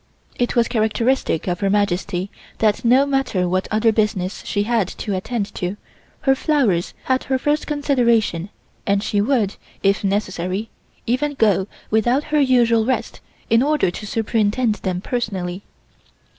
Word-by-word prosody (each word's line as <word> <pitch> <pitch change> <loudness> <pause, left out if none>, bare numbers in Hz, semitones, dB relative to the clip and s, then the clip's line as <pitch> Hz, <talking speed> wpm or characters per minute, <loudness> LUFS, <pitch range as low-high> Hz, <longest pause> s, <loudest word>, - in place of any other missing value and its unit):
It 245 - 0
was 235 -1 +3
characteristic 225 -4 0
of 175 -1 -1
Her 195 - +1
Majesty 195 -1 0 0.3
that, 215 -2 +1
no 255 +4 +5
matter 270 -10 0
what 185 +1 0
other 220 +1 +3
business 210 -3 -1
she 205 - 0
had 225 -3 +1
to 205 - -5
attend 205 +2 -3
to, 180 +3 -3 0.4
her 270 - +4
flowers 260 - +1
had 260 0 0
her 265 0 +1
first 295 +3 0
consideration 235 - +1 0.4
and 200 0 +2
she 205 -2 +1
would, 215 -4 +1 0.3
if 195 +1 +2
necessary, 195 0 -2 0.4
even 285 +5 0
go 205 -6 +2 0.2
without 240 +6 +2
her 300 - +4
usual 240 -4 +4
rest 255 +3 -2 0.3
in 230 +1 +4
order 295 -9 +2
to 210 - -7
superintend 220 +2 +1
them 185 -2 -2
personally. 195 -6 -3
220 Hz, 145 wpm, -21 LUFS, 195-250 Hz, 0.4 s, no